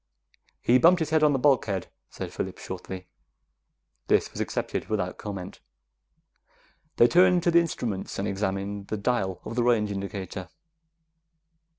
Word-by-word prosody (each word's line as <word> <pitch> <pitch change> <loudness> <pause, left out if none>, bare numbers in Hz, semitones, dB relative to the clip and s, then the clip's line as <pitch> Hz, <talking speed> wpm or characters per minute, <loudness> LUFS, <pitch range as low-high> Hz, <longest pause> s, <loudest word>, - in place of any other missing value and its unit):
"He 125 +2 +5
bumped 175 +5 +6
his 160 -2 -2
head 155 -1 +4
on 150 -1 +5
the 140 - +2
bulkhead," 125 -9 +1 0.2
said - - -7
Phillips - - -5
shortly. 90 -1 -7 1.0
This - - +2
was - - -5
accepted - - -3
without 95 -4 -2
comment. 100 -3 -6 1.4
They 120 - +7
turned 180 +3 +5
to 175 - +3
the 170 - +6
instruments 120 - -3
and 100 - -1
examined 100 0 -3
the 110 - -3
dial 100 -4 -1
of 115 - -5
the 120 - +2
range 110 -4 +2
indicator. 95 -1 -5
105 Hz, 145 wpm, -27 LUFS, 95-145 Hz, 1.4 s, They